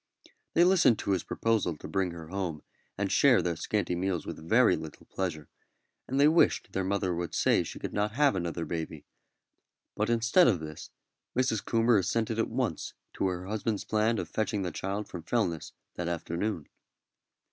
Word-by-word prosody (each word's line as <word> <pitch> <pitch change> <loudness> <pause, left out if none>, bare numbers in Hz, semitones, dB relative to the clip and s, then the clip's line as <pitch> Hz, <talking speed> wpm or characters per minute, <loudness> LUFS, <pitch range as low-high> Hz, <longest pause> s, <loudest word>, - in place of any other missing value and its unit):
They 170 - +6
listened 175 - +5
to - - -2
his 95 -3 +2
proposal 105 -8 0
to - - -9
bring 95 -2 0
her 85 -2 -9
home 90 -5 -3 0.3
and 100 0 -1
share 135 -4 +5
their 85 -1 -1
scanty 95 +2 -1
meals 90 -2 -1
with 80 +1 -8
very - - +5
little - - -9
pleasure, 80 -6 -4 0.6
and 135 +2 -1
they 145 - +7
wished 160 +2 +3
their 95 - -1
mother 95 -1 0
would 85 -1 -3
say - - +3
she - - -6
could - - -5
not 105 +1 0
have 140 -3 +3
another 85 -2 -2
baby; 80 -2 -5 0.9
but 105 +2 0
instead 120 +10 +4
of 95 -7 +3
this 75 -1 -8 0.5
Mrs. 125 -5 +1
Coomber 115 -1 +3
assented 110 +4 -1
at 115 - +1
once - - -2 0.2
to - - 0
her 90 0 -3
husband's 105 +1 -2
plan 110 +1 +1
of 85 - -3
fetching 105 +2 -1
the 90 - -2
child 100 +2 -3
from 90 - -7
Fellness 85 -3 -1 0.3
that 85 - -2
afternoon. 85 +1 -3
95 Hz, 180 wpm, -29 LUFS, 85-115 Hz, 0.9 s, they